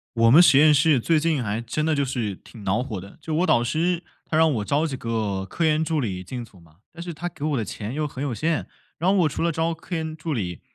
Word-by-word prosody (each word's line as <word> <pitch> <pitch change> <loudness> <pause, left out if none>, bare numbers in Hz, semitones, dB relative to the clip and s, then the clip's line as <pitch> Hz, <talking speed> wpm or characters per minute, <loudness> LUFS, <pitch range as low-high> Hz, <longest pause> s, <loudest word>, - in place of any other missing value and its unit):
我 115 0 +5
们 165 +7 +9
实 140 -5 +6
验 155 0 +6
室 145 -2 +4
最 160 +6 +2
近 155 -4 +1
还 105 -1 -2
真 150 +7 -2
的 160 - +2
就 140 -1 +1
是 120 -7 -3
挺 110 +2 -14
恼 100 +5 +1
火 110 -7 -5
的， 100 +2 -13
就 155 0 -5
我 175 +4 +2
导 120 - +3
师 170 +7 0 0.2
他 155 - -2
让 160 -1 +4
我 105 -3 -2
招 145 +7 +1
几 145 - -4
个 110 -6 -2
科 165 - -2
研 155 0 +3
助 160 -1 0
理 95 -6 -3
进 120 +6 -6
组 100 -5 -18
嘛， 80 -2 -22 0.2
但 170 - -9
是 175 -1 -6
他 175 +3 -4
给 155 - -16
我 150 -2 0
的 115 - -1
钱 105 +4 -6
又 150 +1 -1
很 135 -2 -6
有 140 -5 -2
限， 160 +8 -1 0.3
然 180 +4 +2
后 200 - +3
我 165 -4 +4
除 150 - -4
了 170 - +2
招 165 +1 0
科 170 +2 -6
研 160 -1 -3
助 160 -1 -4
理 90 -7 -3
145 Hz, 300 characters per minute, -24 LUFS, 115-160 Hz, 0.3 s, 们